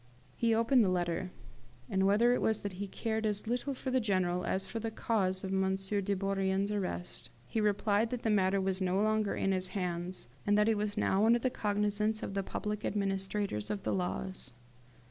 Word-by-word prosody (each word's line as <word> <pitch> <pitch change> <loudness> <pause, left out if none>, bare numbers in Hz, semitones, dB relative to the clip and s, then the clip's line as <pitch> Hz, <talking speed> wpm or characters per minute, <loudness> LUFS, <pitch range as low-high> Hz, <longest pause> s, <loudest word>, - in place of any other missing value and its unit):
He 230 -1 +2
opened 230 +2 +4
the 195 - +2
letter; 175 0 -1 0.6
and 190 +4 +2
whether 230 +5 +4
it - - 0
was 220 -1 +1
that 200 -2 -3
he 200 - -2
cared 220 +3 -2
as 210 -1 -1
little 250 +4 -1
for 260 0 -4
the 260 - +3
General 185 -5 0
as 190 +2 0
for 210 +4 -5
the 225 0 -2
cause 195 -4 0
of 190 0 -3
M. 190 0 +2
de 200 +1 -1
Bourrienne's 195 +1 0
arrest, 185 -3 -4 0.2
he 220 - -1
replied 210 +1 +2
that 245 -1 -4
the 225 - +2
matter 195 -1 +3
was 190 0 -1
no 185 +1 +1
longer 215 -1 +1
in 195 - 0
his 185 -1 0
hands, 180 -3 -3 0.2
and 205 0 +3
that 210 +1 +4
it 225 - +3
was 205 0 -2
now 195 +2 +2
under 235 +1 +6
the 250 +2 -1
cognisance 210 0 0
of - - -4
the 195 - 0
public 210 +2 -4
administrators 195 - -1
of 205 -2 -3
the - - 0
laws. 185 -6 -3
200 Hz, 205 wpm, -32 LUFS, 190-215 Hz, 0.6 s, under